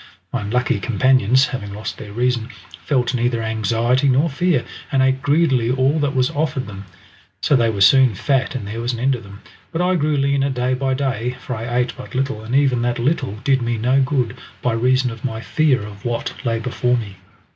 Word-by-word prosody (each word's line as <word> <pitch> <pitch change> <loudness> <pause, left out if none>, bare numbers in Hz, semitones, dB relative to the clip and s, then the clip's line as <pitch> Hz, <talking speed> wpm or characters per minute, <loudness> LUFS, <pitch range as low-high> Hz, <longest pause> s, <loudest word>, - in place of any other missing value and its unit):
My 125 - -1
unlucky 115 +1 0
companions 130 +3 +3
having 105 -7 -5
lost 105 - -6
their 105 - -8
reason, 120 +1 0 0.3
felt 130 -3 0
neither 120 -1 0
anxiety 115 +5 +1
nor 140 +5 +2
fear, 155 -2 +1 0.3
and 135 - +2
ate 130 0 +1
greedily 145 -5 +2
all 135 +4 +2
that 145 -2 -1
was 130 -1 +2
offered 145 -3 -1
them. 100 -1 -9 0.6
So 145 - +3
they 115 -3 +3
were 100 -3 -3
soon 130 +2 +6
fat 135 +6 0
and 120 -6 -4
there 115 +3 -5
was 120 +1 -1
an 115 - -5
end 135 +3 +2
of 120 - -4
them, 100 0 -13 0.3
but 165 - -3
I 180 +1 +2
grew 155 -3 +1
leaner 140 0 +1
day 125 -1 0
by 130 0 0
day, 130 -3 -2
for 125 -1 -5
I 120 +2 -3
ate 125 0 0
but 130 - -10
little, 135 -4 -1
and 115 +4 -3
even 135 -4 +3
that 120 0 0
little 130 -2 0
did 135 -2 +2
me 120 -1 -1
no 125 +5 +2
good 130 -3 0 0.3
by 125 - +1
reason 125 +2 +2
of 115 -1 -10
my 110 -3 -3
fear 135 -1 +1
of 100 0 -10
what 120 -1 -2
lay 115 -3 0
before 125 +1 0
me. 100 -5 -6
125 Hz, 210 wpm, -20 LUFS, 115-135 Hz, 0.6 s, soon